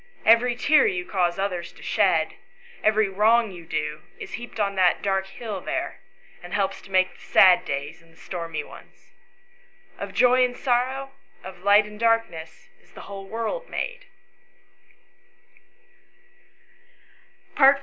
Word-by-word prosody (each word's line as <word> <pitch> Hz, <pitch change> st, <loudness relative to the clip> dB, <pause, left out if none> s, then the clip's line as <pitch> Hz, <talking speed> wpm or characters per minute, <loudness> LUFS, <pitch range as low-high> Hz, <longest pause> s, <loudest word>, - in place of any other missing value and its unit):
Every 235 Hz, +2 st, +5 dB
tear 305 Hz, -, +4 dB
you 375 Hz, -3 st, -2 dB
cause 180 Hz, -, 0 dB
others 180 Hz, -3 st, -3 dB
to -, -, -15 dB
shed, -, -, +2 dB, 0.5 s
every 215 Hz, -1 st, +3 dB
wrong 215 Hz, +3 st, +3 dB
you 170 Hz, -3 st, -12 dB
do, 150 Hz, -1 st, -3 dB, 0.2 s
is -, -, -8 dB
heaped 240 Hz, -1 st, -8 dB
on 200 Hz, -1 st, 0 dB
to 185 Hz, -2 st, +4 dB
the -, -, -21 dB
dark 195 Hz, -1 st, 0 dB
hill 200 Hz, 0 st, -6 dB
there, 330 Hz, -, -4 dB, 0.4 s
and 175 Hz, -1 st, -6 dB
helps 195 Hz, -2 st, -1 dB
to -, -, -16 dB
make 185 Hz, 0 st, +2 dB
the -, -, -20 dB
sad 185 Hz, -2 st, +5 dB
days 140 Hz, +3 st, -5 dB
and 165 Hz, 0 st, -23 dB
stormy 165 Hz, -3 st, -5 dB
ones. -, -, -16 dB, 0.9 s
Of 200 Hz, -1 st, -7 dB
joy 250 Hz, +1 st, +5 dB
and 245 Hz, 0 st, -1 dB
sorrow, 260 Hz, +2 st, -1 dB, 0.3 s
of 185 Hz, -1 st, -10 dB
light 205 Hz, +2 st, +5 dB
and 210 Hz, 0 st, -11 dB
darkness, 230 Hz, -9 st, -1 dB
is -, -, -26 dB
the -, -, -11 dB
whole 195 Hz, -1 st, -9 dB
world 230 Hz, -, -4 dB
made." -, -, -5 dB
205 Hz, 140 wpm, -24 LUFS, 185-240 Hz, 0.9 s, Every